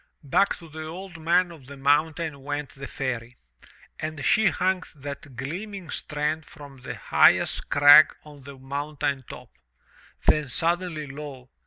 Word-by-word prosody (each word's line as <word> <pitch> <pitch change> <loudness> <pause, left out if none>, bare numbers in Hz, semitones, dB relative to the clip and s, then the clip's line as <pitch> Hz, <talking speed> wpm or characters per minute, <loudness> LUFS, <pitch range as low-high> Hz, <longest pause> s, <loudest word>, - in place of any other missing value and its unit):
Back 150 +8 +2
to 170 - -13
the 155 0 -8
Old 175 +1 -8
Man 175 +2 +2
of 150 -6 -14
the 140 0 -10
Mountain 145 +1 +1
went 145 +1 -4
the 140 0 -9
Fairy. 125 -3 -4 0.6
And 155 -2 -4
she 220 -2 +4
hung 185 0 +1
that 140 -1 -8
gleaming 180 - -6
strand 150 +1 -2
from 145 -3 -13
the 130 - -7
highest - - +3
crag 145 +2 +8
on 150 -2 -14
the 140 +1 -11
mountain 140 0 -3
top. - - -10 0.7
Then 150 -3 +3
suddenly, 170 +2 -1
lo! 140 -2 -9
150 Hz, 145 wpm, -25 LUFS, 140-165 Hz, 0.7 s, crag